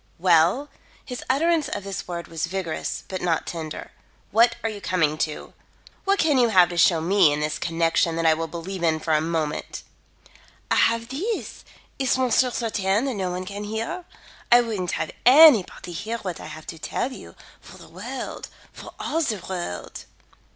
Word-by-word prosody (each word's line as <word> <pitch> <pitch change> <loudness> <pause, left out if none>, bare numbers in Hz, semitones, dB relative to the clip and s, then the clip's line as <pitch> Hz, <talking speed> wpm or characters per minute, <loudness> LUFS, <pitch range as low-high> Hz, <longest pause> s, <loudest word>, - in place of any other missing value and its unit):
"Well?" 180 - +3 0.4
His 250 -1 -6
utterance 315 +3 +2
of 205 - -4
this 195 -1 -5
word 170 -1 -5
was 165 +1 -3
vigorous, 180 -3 -4
but 185 -1 -5
not 170 -2 0
tender. 160 -2 -6 0.4
"What 230 +3 +4
are 225 - 0
you 205 -1 -8
coming 165 -7 +1
to? 155 -2 -3 0.5
What 395 +1 +3
can 300 -7 +3
you 240 -2 +4
have 180 -4 +5
to 175 - -6
show 165 -1 +5
me 180 -2 +4
in 145 - -1
this 150 0 -2
connection 165 0 +1
that 165 0 -1
I 160 - +6
will 165 +1 -3
believe 175 +3 -6
in 160 -2 +2
for 160 0 -1
a 155 - +3
moment?" 160 -2 -3 0.9
"I - - +4
have 230 +1 +2
these 390 - -4 0.4
is 265 -1 +2
monsieur 255 0 +3
certaine 220 -2 0
that 270 - -1
no 190 -4 -2
one 180 +1 -4
can 200 +2 -6
hear? 225 - -4 0.5
I 240 0 +8
wouldn't 210 -7 -3
have - - -2
anybody 250 - +6
hear 220 +7 -4
what 185 -6 -6
I - - -8
have 155 0 -10
to 165 - -8
tell 250 - -2
you, - - -11 0.2
for - - -14
the - - -14
world - - -7 0.3
for - - -11
all 325 - -1
the 230 -9 0
world." 175 - -5
190 Hz, 185 wpm, -24 LUFS, 165-240 Hz, 0.9 s, I